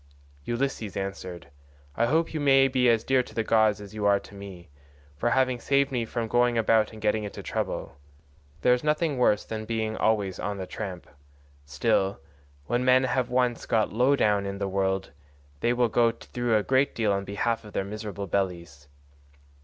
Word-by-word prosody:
Ulysses 120 -4 -2
answered, 95 -4 -6 0.4
"I 115 - +2
hope 160 +5 +1
you 155 - -2
may 135 -2 +5
be 130 -2 +2
as 115 -1 +3
dear 130 -1 +3
to - - -12
the 115 - 0
gods 110 -1 +3
as 100 0 -10
you 105 -1 -5
are 100 0 +4
to - - -15
me, 95 -5 -10 0.4
for 120 - 0
having 130 0 +2
saved 140 +2 +1
me 120 -3 -1
from 115 0 -3
going 120 +1 +2
about 110 -1 +3
and 110 - -11
getting 105 0 0
into 105 - -7
trouble; 70 - -4 0.6
there 125 - +5
is 125 - -1
nothing 150 -2 0
worse 105 -4 +3
than 110 -1 -5
being 110 -1 -2
always 105 -5 0
on 105 -1 -3
the 95 - -4
tramp; 95 -3 -6 0.6
still, 95 +8 0 0.5
when 120 +6 0
men 130 0 +5
have 130 -1 0
once 125 -1 0
got 110 -3 +1
low 125 +5 +3
down 105 -5 +1
in 100 0 -4
the 100 0 -2
world 95 0 -1 0.5
they 120 - +1
will 120 0 +2
go 115 +1 +3
through 115 0 -1
a 105 - 0
great 130 +4 +2
deal 110 -3 +1
on 100 0 -1
behalf 105 +3 -2
of 105 - -12
their 95 - -1
miserable 105 -1 -5
bellies. 85 -7 -3
110 Hz, 190 wpm, -26 LUFS, 100-125 Hz, 0.6 s, may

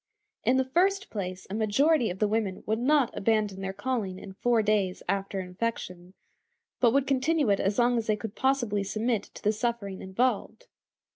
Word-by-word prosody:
In 250 +3 +3
the 260 - +2
first 385 +8 +1
place, 185 -3 -5
a 190 - -7
majority 235 +6 +2
of 180 - -5
the 210 - +2
women 210 -3 -1
would 220 +1 0
not 275 0 +2
abandon 210 -2 0
their 190 0 -3
calling 210 -4 -3
in 190 0 -10
four 230 +2 +2
days 205 -3 0
after 195 0 -1
infection, 180 -2 -5 0.6
but 240 -2 +5
would 275 +2 +2
continue 275 -1 +2
it 200 - +2
as 200 +1 0
long 240 0 +3
as 225 - -5
they 215 - +3
could 210 -1 -6
possibly 240 -7 +1
submit 220 +2 0
to - - -14
the 210 - +3
suffering 215 -4 -3
involved. 245 - -1
220 Hz, 185 wpm, -28 LUFS, 195-255 Hz, 0.6 s, but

